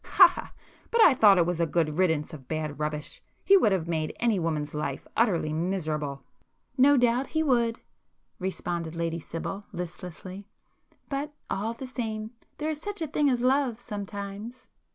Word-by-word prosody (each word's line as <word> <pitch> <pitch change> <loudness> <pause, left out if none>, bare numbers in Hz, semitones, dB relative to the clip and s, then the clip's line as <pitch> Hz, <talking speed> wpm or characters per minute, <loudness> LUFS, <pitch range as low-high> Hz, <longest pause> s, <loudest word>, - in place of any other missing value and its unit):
ha 370 - +8
ha!—but 465 +5 -7
I 310 - +8
thought 210 -6 +6
it 175 - +4
was 175 -1 -1
a 170 - +2
good 160 0 0
riddance 160 -3 +1
of 135 -5 -10
bad 155 -2 -3
rubbish. 150 0 -4 0.2
He 395 - +7
would 360 - +5
have 180 -4 0
made 160 -2 -2
any 230 -5 +2
woman's 155 -3 -2
life 150 +1 -3
utterly 175 -9 +2
miserable." 155 -5 -2 0.5
"No 280 +2 +6
doubt 245 +2 +2
he 315 0 0
would!" 235 -5 +2 0.6
responded 175 -3 -3
Lady 165 0 -2
Sibyl, 170 +5 -5
listlessly; 180 +2 -7 0.6
"But, 290 +1 -3 0.2
all 215 +4 -1
the 265 - -7
same, 220 -4 -4 0.3
there 305 +1 -1
is 300 -1 -5
such 410 +1 -5
a - - -2
thing 295 0 +2
as 245 -2 +1
love 255 -2 +2
sometimes." 205 +1 -7
195 Hz, 165 wpm, -27 LUFS, 165-250 Hz, 0.6 s, ha